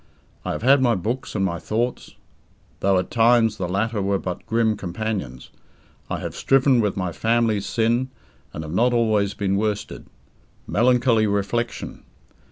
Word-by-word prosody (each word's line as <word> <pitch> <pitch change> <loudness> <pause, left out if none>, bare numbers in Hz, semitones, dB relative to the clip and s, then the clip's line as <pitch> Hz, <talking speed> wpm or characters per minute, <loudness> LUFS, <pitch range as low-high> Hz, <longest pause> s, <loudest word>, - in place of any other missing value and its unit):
I - - -2
have - - -5
had 135 +2 +5
my 120 -3 +3
books 115 +8 -4
and 95 -2 +1
my 85 -2 -2
thoughts 120 +3 -3 0.6
though 95 -1 +2
at 90 - -2
times 115 -2 +3
the 90 -2 -3
latter 105 +3 -1
were 100 0 +1
but 90 -2 -5
grim 115 -1 +1
companions. 95 - -5 0.6
I - - -2
have - - -5
striven 135 -2 +3
with 105 -3 -1
my 90 -2 -2
familiar 115 +1 +1
sin, 120 +4 0 0.4
and 80 - -6
have 80 0 -7
not 120 +6 +2
always 110 -4 +1
been 100 -1 0
worsted. 105 0 -3 0.6
Melancholy 120 -1 +3
reflection. 100 +4 -2
110 Hz, 155 wpm, -22 LUFS, 100-120 Hz, 0.6 s, had